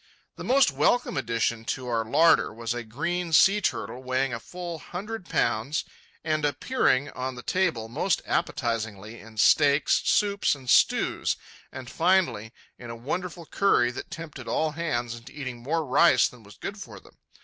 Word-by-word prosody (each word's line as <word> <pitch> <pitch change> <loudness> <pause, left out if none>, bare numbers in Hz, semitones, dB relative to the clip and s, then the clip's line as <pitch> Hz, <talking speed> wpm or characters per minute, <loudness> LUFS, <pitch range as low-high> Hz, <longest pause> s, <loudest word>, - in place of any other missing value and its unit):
The - - -8
most 265 - +4
welcome 145 - +1
addition 115 -3 -1
to 130 +1 -3
our 115 -2 0
larder 160 +9 +4
was 115 +1 -4
a 120 - -4
green 165 +10 -3
sea 200 +6 +6
turtle, 130 -8 -2
weighing 130 0 -1
a 115 - -3
full 175 +4 -7
hundred 200 +4 -7
pounds 120 +6 0 0.4
and 155 -1 -1
appearing 145 - +1
on 130 0 -4
the 125 - -9
table 165 -12 0
most 160 +9 -1
appetizingly 115 -2 -2
in 110 0 -14
steaks, 145 +6 +4
soups, 200 -6 +2
and 130 -2 -14
stews, - - +2 0.3
and 130 -1 -8
finally 165 - +1 0.3
in 120 - -9
a 115 - -6
wonderful 170 +8 -5
curry 125 -11 +2
which 125 - -8
tempted 165 -2 -8
all 160 -1 0
hands 120 -8 -2
into 115 +1 -11
eating 130 -3 -5
more 155 +6 -1
rice 170 +6 +5
than 125 - -14
was 105 -1 -16
good 200 +1 -6
for 190 - -9
them. - - -21
135 Hz, 165 wpm, -26 LUFS, 120-170 Hz, 0.4 s, sea